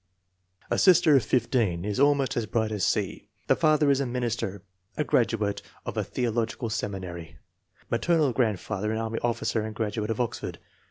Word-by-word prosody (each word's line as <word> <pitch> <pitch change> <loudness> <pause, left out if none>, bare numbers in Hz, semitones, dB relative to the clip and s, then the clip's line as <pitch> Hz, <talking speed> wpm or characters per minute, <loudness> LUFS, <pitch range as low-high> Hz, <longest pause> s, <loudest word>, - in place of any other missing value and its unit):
A - - +2
sister 175 -5 +6
of 130 - +4
15 110 -7 +1
is 105 +1 -2
almost 140 -2 +3
as 115 -2 -1
bright 110 -2 0
as 105 -3 -2
C. - - -1 0.2
The - - +3
father 155 -3 +3
is 135 - +2
a 140 - 0
minister, 120 -6 -3 0.3
a 150 - +1
graduate 110 -6 +1 0.2
of - - -4
a - - 0
theological 115 -1 -2
seminary. 90 -8 -5 0.5
Ma 115 - +3
ternal 160 -6 +2
grandfather 110 -2 -1
an 110 - -1
army 115 0 -2
officer 120 -1 0
and 110 0 -5
graduate 105 -1 -2
of 115 - -2
Oxford. 120 -1 -3
115 Hz, 170 wpm, -27 LUFS, 105-130 Hz, 0.5 s, sister